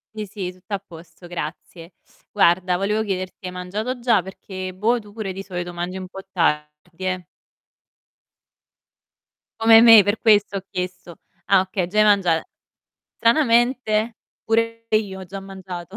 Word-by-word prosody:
Sì, 215 - -4
sì, 190 -3 -5
tutto 185 +3 -12
a 200 - 0
posto, 165 +1 -14
grazie. 170 +1 -7 0.4
Guarda, 180 +1 +3
volevo 210 +3 0
chiederti: 185 -2 -5
hai 180 - -4
mangiato 210 +8 -4
già? 235 -6 +2
Perché 185 0 -7
boh, 220 +6 +1
tu 210 -1 -15
pure 215 -3 -4
di 195 +1 -7
solito 175 -2 -5
mangi 175 +2 -4
un 185 -1 -6
po' 195 +1 -9
tardi, 150 +1 -2
eh. 185 -2 -2 2.4
Come 225 0 +8
me, 225 -3 +9
per 205 +2 0
questo 210 -3 +4
ho - - -5
chiesto. 180 -1 -6 0.3
Ah, 195 -1 +5
okay, 185 -1 -1
già 210 +4 -5
hai 215 - +6
mangia 190 -6 +3 0.8
stranamente 235 -3 +2 0.3
pure 230 0 0
io 205 -3 0
ho - - -7
già 195 +2 -8
mangiato. 190 -1 -9
190 Hz, 150 wpm, -22 LUFS, 180-215 Hz, 2.4 s, me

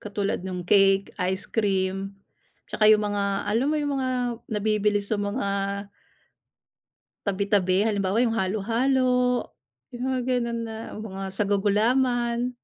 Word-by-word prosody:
katulad 205 -1 -2
nung 180 -1 -5
cake, 195 +1 +3 0.2
ice 190 +2 -2
cream, 195 -2 -1 0.5
'tsaka 215 0 +2
'yung 215 -1 +6
mga, 200 -1 -1
alam 230 +6 +1
mo 310 - +1
'yung 290 -1 -1
mga 260 - -1 0.4
nabibili 210 -1 +1
sa 205 +1 -2
mga 200 0 -2 1.8
tabi-tabi. 200 0 +1
Halimbawa 200 -1 0
'yung 235 -2 +2
halo-halo, 250 +5 +1 0.5
'yung 240 - -6
mga 255 -1 0
ganun 240 -2 0
na 225 0 -7
mga 195 -3 -6
sago-gulaman. 235 +5 +1
210 Hz, 120 wpm, -25 LUFS, 195-235 Hz, 1.8 s, yung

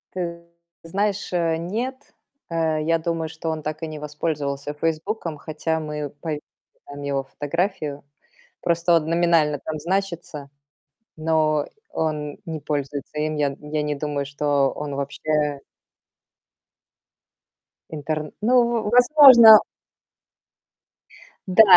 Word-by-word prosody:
Ты 170 -2 -4 0.4
знаешь, 200 +3 -2
э, 165 -2 +1
нет. 220 +11 -3 0.5
Э, 160 -2 0
я 165 +2 +1
думаю, 165 0 -2
что 160 +1 -5
он 160 -1 -3
так 155 +1 -5
и - - -2
не 155 -1 -7
воспользовался 150 -1 -3
"Фейсбуком", 165 +3 -2
хотя 160 +1 -3
мы 150 -1 -4
пов 155 -3 -3 0.5
там 145 0 -9
его 140 -1 -1
фотографию. 150 +1 -3 0.6
Просто 170 0 +2
он 155 -2 +1
номинально 165 -4 +2
там 155 -1 -4
значится, 170 -4 -3 0.7
но 155 -2 +1 0.2
он 150 -2 -3
не 160 -3 -5
пользуется 145 0 -4
им. 155 0 -1
Я 150 -1 +2
н 135 - -7
я 155 0 0
не 150 0 -1
думаю, 145 -1 -3
что 145 -1 +1
он 145 -1 -5
вообще 145 +1 -1 2.3
интерн 155 0 -3
ну, 230 +4 +2
в 235 -3 -1
возможно 245 -3 +9 1.9
Да, 185 +4 +7
155 Hz, 120 wpm, -23 LUFS, 150-170 Hz, 2.3 s, возможно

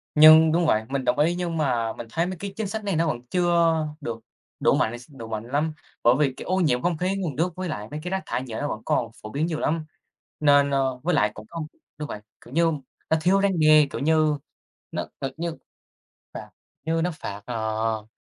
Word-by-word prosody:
nhưng 155 +1 +9
đúng 170 +1 +2
vậy, 110 -7 +3
mình 135 -1 -1
đồng 125 +3 +1
ý 165 +4 +3
nhưng 175 -2 -2
mà 120 -7 0
mình 120 - -8
thấy 165 +5 +1
mấy 185 +1 -4
cái 200 +2 -6
chính 220 -3 -2
sách 220 +1 -4
này 200 -4 -1
nó 165 +1 +2
vẫn 120 -6 -2
chưa 170 -2 +3 0.3
được 115 -4 -4 0.4
đủ - - +4
mạnh 120 +2 0
s 120 - -16
đủ 115 - -7
mạnh 110 -1 -4
lắm, 150 +4 0 0.3
bởi 120 +2 +6
vì 135 -3 +2
cái - - -7
ô 185 - 0
nhiễm 125 -8 +2
không 175 -2 0
khí, 185 +4 0
nguồn 170 -8 -3
nước 165 +4 0
với 185 -1 -4
lại 105 -7 -4
mấy 150 - -4
cái 180 - -4
rác 190 0 -1
thải 130 - -2
nhựa 110 -2 -5
nó 145 - -1
vẫn 110 -5 -4
còn 115 -2 0
phổ 105 - -8
biến 145 +7 -1
nhiều 160 -2 -2
lắm. 160 0 0 0.6
Nên, 145 -1 +5
a 140 - +2 0.2
với 175 +1 +1
lại 105 -7 +3
cũng 110 0 -10
không 165 -2 -5 0.3
đúng 150 0 -5
vậy, 105 - -6 0.2
kiểu 125 - -12
như, 165 0 +3 0.4
nó 160 - +5
thiếu 195 +4 +4
răn 190 -4 +2
đe, 155 -1 +6
kiểu - - -5
như, 155 0 +3 0.5
nó - - -3 0.2
thật 135 -1 -2
như 170 -1 -3 0.8
phạt - - -7 0.4
như 165 0 0
nó 180 - +1
phạt, 100 -7 -7
ờ, 110 -2 -2
155 Hz, 235 wpm, -25 LUFS, 120-170 Hz, 0.8 s, nhưng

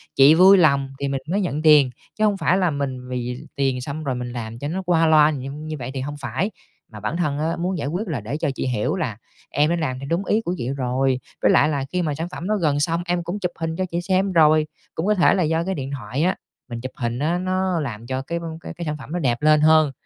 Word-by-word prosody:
chị 140 +3 +7
vui 190 +3 +8
lòng 140 -5 +3
thì 140 - -1
mình 135 -1 -2
mới 200 +3 +1
nhận 155 -5 -2
tiền. 150 -4 +6 0.3
Chứ 215 - 0
hông 205 -2 +2
phải 185 -1 +2
là 180 -3 +2
mình 135 -3 -4
vì 125 0 -4
tiền 135 -2 0
xong 145 +4 -5
rồi 135 -4 -1
mình 125 0 -5
làm 115 -1 -6
cho 145 - -4
nó 180 +5 -2
qua 170 -3 +2
loa 155 -1 +6
như 135 -2 -5
như 155 +2 -6
vậy 125 +1 -5
thì 135 - -3
hông 145 +2 -5
phải. 185 +9 -2 0.4
Mà 105 - -9
bản 110 +10 -3
thân 150 -5 -1
á, 160 +2 0
muốn 180 +2 -1
giải 145 - -3
quyết 180 +9 -3
là 150 - -3
để 120 +8 -4
cho 155 - -1
chị - - -2
hiểu 120 - 0
là 150 - -3 0.3
"Em 150 +1 +2
đã 170 - +2
làm 150 -7 -2
theo 135 - -7
đúng 175 +4 0
ý 215 - +2
của 175 -5 -2
chị 120 - -3
rồi, 130 0 0 0.2
với - - +4
lại - - +4
là 140 -3 -1
khi 180 - 0
mà 155 -4 -1
sản 165 +4 -4
phẩm 180 - -6
đó 215 - +1
gần 145 -3 +2
xong 165 +3 0
em 175 0 -1
cũng 175 +5 -4
chụp 180 -3 -2
hình 160 0 -2
cho 185 +2 -1
chị 170 +1 -1
xem 190 +2 +1
rồi." 155 -2 +4 0.3
Cũng 160 - -2
có 210 - +3
thể 180 - +4
là 190 -2 +2
do 160 +1 +1
cái 190 +2 -2
điện 135 -2 -5
thoại 130 +1 -3
á, 185 +2 +2 0.3
mình 120 -1 -5
chụp 130 +1 -5
hình 120 0 -3
á, 160 +5 +1
nó 185 -1 0
làm 120 -6 -5
cho 130 +1 -2
cái 170 +5 -4
v - - -10 0.2
cái 170 - -7
sản 150 -1 -3
phẩm 140 +1 -11
nó 175 - -1
đẹp 125 -4 0
lên 155 0 +5
hơn, 155 -1 +5
155 Hz, 280 wpm, -22 LUFS, 135-175 Hz, 0.4 s, vui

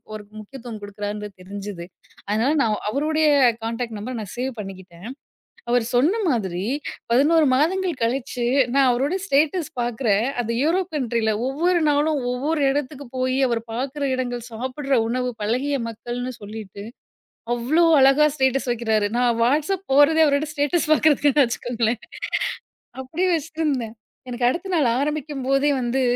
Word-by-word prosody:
ஒரு 210 -1 -8
முக்கியத்துவம் 230 -1 -9
கொடுக்குறாருன்றது 205 0 -6
தெரிஞ்சுது. 195 -2 -7 0.4
அதனால 220 +7 +2
நான் 215 -2 +1
அவருடைய 310 +4 +1 0.3
கான்டாக்ட் 230 0 -3
நம்பர் 235 +3 -5
நான் 200 -4 -8
சேவ் 260 +2 -2
பண்ணிக்கிட்டேன். 190 0 -10 0.6
அவர் 240 -1 +2
சொன்ன 330 - +3
மாதிரி 190 -5 -2 0.5
11 305 +5 +4
மாதங்கள் 345 +2 0
கழிச்சு, 245 0 -1 0.3
நான் 275 -1 +4
அவருடைய 285 +10 -1
ஸ்டேட்டஸ் 310 +1 +1
பார்க்குறேன். 230 -2 +1
அந்த 230 -1 -3
யூரோப் 345 +2 0
கண்ட்ரில்ல 230 -4 0 0.2
ஒவ்வொரு 275 +5 -4 0.3
நாளும், 295 +1 +2
ஒவ்வொரு 295 +5 -1
இடத்துக்கு 285 0 -4
போய் 255 0 0
அவர் 235 -2 0
பார்க்கிற 270 +4 -3
இடங்கள், 245 -2 -2
சாப்புடுற 260 +5 -3
உணவு, 250 +2 -1
பழகிய 255 +7 0
மக்கள்ன்னு 240 +3 -5
சொல்லிட்டு 215 +1 -7 0.9
அவ்ளோ 255 +8 +2 0.2
அழகா 275 +3 +6
ஸ்டேட்டஸ் 265 -1 +1
வைக்கிறாரு. 220 -3 0
நான் 245 -1 +3
Whatsapp 305 +10 +1
போறதே, 290 +4 +5
அவரோட 285 0 +2
ஸ்டேட்டஸ் 305 +3 0
பார்க்கறதுக்குத்தான் 295 -2 +4
வச்சுக்கோங்களேன், 235 -1 -2 1.0
அப்படியே 315 +8 -2
வச்சிட்டிருந்தேன். 300 -7 -2 0.3
எனக்கு 240 0 -1
அடுத்த 355 +9 -2
நாள் 300 -7 +3
ஆரம்பிக்கும்போதே 285 -1 0
வந்து 250 +2 0
255 Hz, 130 wpm, -22 LUFS, 230-290 Hz, 1.0 s, அழகா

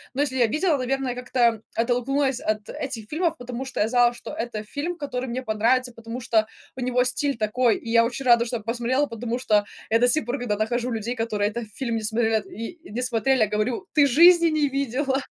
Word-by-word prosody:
но 280 - +1
если 270 -3 -1
я 240 -2 +4
видела, 310 - +1
наверное, 265 0 -1
как-то 245 -3 +1
оттолкнулась 255 +3 0
от 215 0 -2
этих 240 -6 -5
фильмов, 325 +1 0
потому 245 +1 -6
что 265 - -6
я 215 - +2
знала, 245 0 +4
что - - -9
это 225 -2 -4
фильм, 300 +10 -4
который 260 -4 -4
мне 255 +2 -3
понравится, 245 +3 +1
потому 230 +1 -7
что 220 -3 +1 0.3
у 260 - -9
него 250 0 +1
стиль 275 +2 -1
такой, 225 +2 +2
и 230 - -9
я 230 0 +5
очень 245 +3 -3
рада, 235 -1 +5
что 240 - -4
я 225 - -11
посмотрела, 240 +5 0
потому 235 -2 -4
что 210 -5 +2 0.3
я 225 - +4
до 245 - +4
си 305 +5 +3
пор, 245 +4 -3
когда 240 -4 -1
нахожу 240 +3 -1
людей, 230 +1 -3
которые 215 -3 -1
этот 235 0 -5
фильм 235 -4 -2
не - - -3
смотрят 220 -1 0
и 230 - -8
не 230 +4 -3
смотрели, 255 +1 +1
я 215 - +4
говорю: 215 - -1
"Ты 290 -2 +5
жизни 340 +5 +6
не 310 -2 +2
видела!" 270 0 -1
245 Hz, 220 wpm, -24 LUFS, 225-265 Hz, 0.3 s, жизни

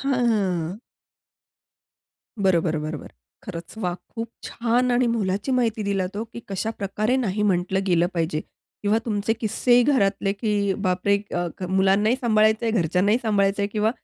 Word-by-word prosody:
हां, 275 0 0
हां, 245 -1 +2
हां. 185 -4 0 1.7
बरोबर, 170 -3 +2
बरोबर. 155 -1 -5 0.3
खरचं 170 +6 -8
वा! 180 -3 0 0.2
खूप 230 0 -4 0.2
छान! 245 +2 0
आणि 245 0 +3
मोलाची 210 0 -1
माहिती 230 -4 +1
दिलात 195 -1 -2
हो, 220 - -2
की 235 +1 -10
कशाप्रकारे 215 +3 -1
नाही 210 -5 -1
म्हटलं 190 -1 +1
गेलं 175 -1 +3
पाहिजे 160 -2 -1 0.4
किंवा 210 +2 +2
तुमचे 210 -1 0
किस्सेही 240 +2 +2
घरातले 200 -7 +2
की 215 +2 -3 0.4
बापरे! 185 +2 +2
अ, 175 0 -1
क - - -9
मुलांनाही 200 +5 +3
सांभाळायचं 220 -1 +3
आहे, 225 - +1
घरच्यांनाही 185 +7 +2
सांभाळायचं 200 -2 +1
आहे 200 - 0
किंवा 215 +1 +2
205 Hz, 150 wpm, -24 LUFS, 185-225 Hz, 1.7 s, आणि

